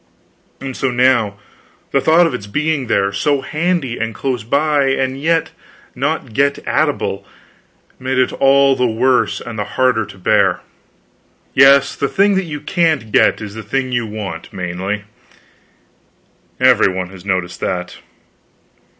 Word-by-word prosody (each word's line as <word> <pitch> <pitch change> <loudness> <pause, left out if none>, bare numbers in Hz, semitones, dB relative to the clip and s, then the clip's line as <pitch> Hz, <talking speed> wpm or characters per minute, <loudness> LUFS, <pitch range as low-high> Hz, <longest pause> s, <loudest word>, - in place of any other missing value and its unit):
And 135 -1 -6
so 135 - -1
now, 120 -5 +2 0.5
the - - +2
thought 165 +2 +4
of 165 - -1
its 105 -5 -6
being 145 +3 -1
there, 100 -2 +1
so 135 +8 0
handy 155 -6 -2
and 115 -1 -3
close 130 -5 -3
by, 145 +4 +1
and 135 0 -1
yet 165 +1 +1 0.4
not 135 -2 -3
get 140 +3 +2
at - - +2
able, 100 0 -4 0.8
made 130 0 -2
it 130 - +2
all 135 0 +4
the 125 - +1
worse 110 -3 +1
and 115 -2 -7
the - - 0
harder 125 -5 +2
to 100 - -13
bear. 90 - +2 0.9
Yes, 140 +1 +5
the 140 - -1
thing 200 +1 +3
that 190 -1 0
you 150 -3 -6
can't 160 - 0
get - - +3
is 105 -2 -7
the 110 - -7
thing 130 +5 -2
that - - -6
you 120 -2 -1
want, 105 -2 -7
mainly; 95 +3 -4 1.6
every 95 - +4
one 95 0 -4
has 95 -2 -12
noticed 95 -3 -2
that. 90 -1 -3
130 Hz, 155 wpm, -17 LUFS, 105-140 Hz, 1.6 s, Yes